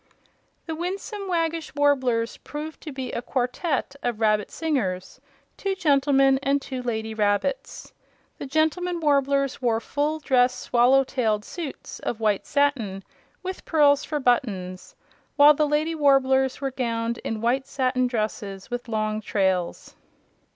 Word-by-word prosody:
The 325 - -4
Winsome 390 +4 -4
Waggish 330 -4 -1
Warblers 260 -5 +1
proved 300 +1 -7
to 310 - -7
be 265 -2 -5
a - - -3
quartette 265 +4 -2
of 240 -3 -2
rabbit 215 -2 +2
singers, 255 - -2 0.4
two 390 -1 -2
gentlemen 275 -5 +3
and 275 +1 +2
two 260 -2 -6
lady 220 -2 -3
rabbits. 210 +5 -1 0.5
The - - -5
gentlemen 320 +4 0
Warblers 275 -3 +1
wore 230 -3 +2
full 290 +6 -1
dress 255 -4 +2
swallow 250 +3 +4
tailed 220 -5 -1
suits 325 -6 -7
of 230 - -4
white 210 -3 0
satin, 240 -10 0 0.4
with 375 0 -5
pearls 290 -2 +4
for 300 -1 -2
buttons, 200 -8 -1 0.4
while 295 0 +8
the 300 +1 +1
lady 300 +3 0
Warblers 265 -3 +3
were 270 -1 -1
gowned 235 -2 -2
in 225 - -4
white 255 +4 0
satin 255 -2 0
dresses 215 -4 -4
with 245 0 -4
long 215 -1 -1
trails. 190 -4 -1
265 Hz, 135 wpm, -25 LUFS, 230-295 Hz, 0.5 s, while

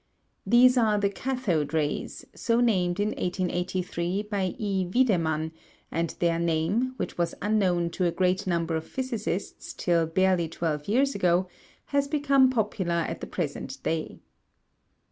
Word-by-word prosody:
These 250 +3 +6
are 215 -3 +3
the 200 -1 +1
cathode 195 - -1
rays, 150 -2 -2
so 230 0 +1
named 185 -6 +2
in 205 +1 +1
1883 180 0 -2
by 200 -3 -2
E. 195 -5 -1
Wiedemann, 165 -10 +1 0.4
and 165 0 -1
their 170 -1 +1
name, 170 +10 0
which - - -4
was 170 - 0
unknown 185 -5 +1
to 180 +2 -1
a 170 - +2
great 185 +2 0
number 170 -2 0
of 160 0 -4
physicists 230 -7 -4
till 170 -2 +1
barely 180 -1 +2
twelve 155 -3 -3
years 270 +6 +2
ago, 180 -1 +2 0.5
has 280 0 +2
become 280 -3 +4
popular 210 -7 -1
at - - -5
the - - -5
present - - -4
day. 160 -1 -3
185 Hz, 145 wpm, -27 LUFS, 170-220 Hz, 0.5 s, These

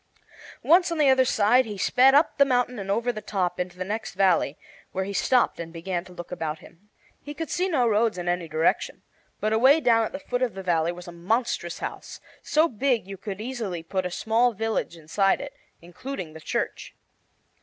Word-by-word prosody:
Once 345 +2 +4
on 335 - -2
the 290 -3 +5
other 260 0 +5
side 240 +3 +4
he 210 -2 -6
sped 260 +7 +4
up 295 0 +3
the - - +9
mountain 250 -3 0
and 195 0 -6
over 230 +5 +1
the 215 -2 -7
top 190 -4 -2
into 180 0 -4
the 185 - -4
next 215 +1 -4
valley, 185 -7 +2 0.4
where, 190 0 -1
he 200 - -5
stopped 250 +4 +2
and 165 -1 -6
began 170 +1 -4
to 185 - -15
look 175 0 -9
about 160 -3 -3
him. 180 +6 -19 0.3
He 290 +1 -8
could 325 0 -5
see 370 +2 0
no 260 -8 +2
roads 220 -2 +2
in 175 0 -5
any 175 -1 -1
direction, 160 +1 0 0.4
but 215 +1 0
away 260 +7 +5
down 230 -5 +3
at - - -3
the - - -5
foot 250 -3 -4
of 250 -5 0
the 190 - -6
valley 170 -2 +1
was 175 0 -10
a - - -7
monstrous 175 0 -2
house, - - -7 0.2
so 310 +2 +2
big 250 - 0
you 195 - -7
could 195 +1 -7
easily 220 -8 -4
put 185 +2 -2
a - - -6
small 230 +6 +1
village 220 -5 -2
inside 195 +5 +1
it, 280 0 -7 0.3
including 180 - -7
the 160 - -11
church. - - -4
210 Hz, 210 wpm, -25 LUFS, 180-250 Hz, 0.4 s, the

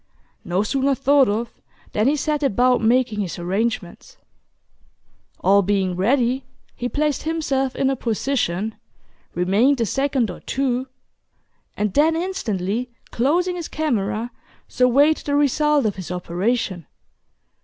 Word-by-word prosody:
No 180 +3 0
sooner 270 +4 +1
thought 275 -2 +4
of, 225 +3 -2 0.4
than 215 +3 +1
he 290 - +3
set 300 +1 -1
about 250 -1 +2
making 235 -1 +2
his 190 -4 -3
arrangements. 200 - -3 1.2
All 200 +1 +5
being 190 -2 0
ready, 245 +6 +1 0.3
he 245 - -3
placed 300 +1 0
himself 275 -5 -1
in 270 - +1
a 270 - +1
position, 220 -4 -1 0.6
remained 210 +10 +2
a 230 - +2
second 265 -2 0
or - - -10
two, 260 -1 -1 0.9
and 210 -2 -1
then 315 +3 +3
instantly 245 - -2 0.2
closing 345 +9 +1
his 345 -2 -5
camera, 235 -6 -2 0.4
surveyed 275 +5 +3
the 285 - -2
result 295 0 +2
of 205 -3 -1
his 185 - -7
operation. 180 - -2
245 Hz, 125 wpm, -22 LUFS, 205-280 Hz, 1.2 s, All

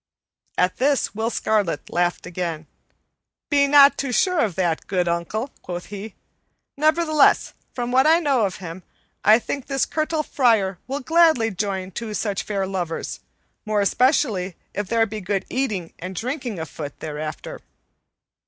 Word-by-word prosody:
At 180 0 +1
this 275 +1 +1
Will 220 +2 -1
Scarlet 215 -6 -1
laughed 175 0 0
again. 170 -3 -4 0.9
"Be 280 -1 +4
not 280 0 +7
too 275 -2 -2
sure 365 +6 +2
of 210 - +1
that, 175 -4 -1
good 180 -3 0
uncle," 170 +10 -2
quoth 175 0 -6
he, 205 +1 -7 0.6
"nevertheless, 310 0 +3 0.2
from 245 -1 -2
what 260 +3 +4
I 325 +1 +6
know 275 -10 +2
of 190 - -7
him, 175 0 -8 0.4
I 215 +2 +7
think 265 +2 -5
this 275 -2 +1
Curtal 310 0 -1
Friar 220 -11 +2
will 275 +2 -3
gladly 315 -6 +4
join 190 -1 -3
two 220 +1 -5
such 205 -3 -1
fair 200 -2 -2
lovers, 180 -4 -4 0.4
more 215 -2 0
especially 205 - +2 0.2
if 205 -1 -3
there 230 +1 +2
be 215 0 -6
good 195 +1 -2
eating 210 -10 -2
and 185 +2 -6
drinking 250 - -3
afoot 155 -3 -7
thereafter." 155 0 -6
215 Hz, 150 wpm, -23 LUFS, 185-270 Hz, 0.9 s, not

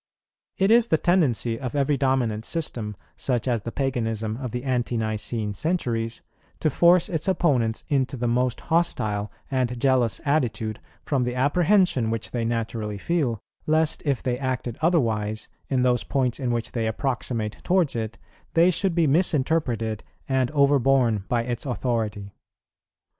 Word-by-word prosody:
It 195 +2 +3
is 235 0 +6
the 160 - +3
tendency 130 - +1
of 130 +1 -4
every 140 0 +2
dominant 130 -6 0
system, 115 -9 -3 0.2
such 125 -1 -1
as 120 -3 +1
the 115 - -5
Paganism 115 -5 -2
of 130 -1 -4
the 125 +2 -4
Ante 125 -3 -1
nicene 110 -1 -2
centuries, 115 - -2 0.4
to 155 - +1
force 175 +4 +5
its 160 +1 -3
opponents 135 -12 +1
into 135 -3 0
the 120 0 -1
most 125 +1 0
hostile 105 -11 0 0.2
and 125 -2 0
jealous 125 -3 +2
attitude, 120 -7 0 0.2
from 135 -4 0
the 125 0 -2
apprehension 150 - +3
which 115 -1 -3
they 120 -2 -1
naturally 115 -2 -2
feel, 130 - -1 0.3
lest 155 0 +2
if 140 -4 -1
they 125 -1 -1
acted 130 -3 -3
otherwise, 110 -10 +1 0.2
in 130 -2 +2
those 125 -1 +2
points 130 -2 0
in 130 -3 -1
which 120 -1 -1
they 115 -3 -1
approximate 115 -2 -2
towards 180 -7 +2
it, 110 -1 -3 0.4
they 170 +2 +6
should 185 0 0
be 170 -2 +3
misinterpreted 135 - +1 0.2
and 130 -2 +1
overborne 135 -7 +3
by 120 -1 +1
its 120 -1 -3
authority. 110 -6 -2
125 Hz, 150 wpm, -25 LUFS, 115-145 Hz, 0.4 s, is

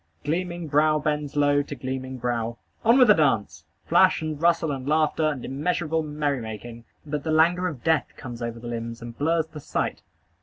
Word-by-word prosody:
Gleaming 175 +1 -2
brow 155 +1 +3
bends 150 -1 -2
low 145 0 +3
to 145 0 -6
gleaming 130 0 -5
brow. 120 -1 -2 0.3
On 230 +3 +5
with 255 -2 +7
the 210 - +8
dance! 140 - 0 0.2
Flash, - - +4
and 155 -1 -4
rustle, 165 -2 +3
and 135 -1 -5
laughter, 155 0 +2
and 145 -5 -4
immeasurable 160 +3 -1
merry 150 -3 -2
making! 115 +1 -8 0.2
But 150 -1 -3
the 160 - -3
languor 170 +3 +3
of 150 -9 -6
death 160 -2 +2
comes 120 -3 -8
over 115 0 -4
the 120 - -11
limbs, 115 0 -5
and 120 -1 -8
blurs 160 +3 +1
the 160 -1 -10
sight. - - -2
150 Hz, 190 wpm, -25 LUFS, 125-160 Hz, 0.3 s, the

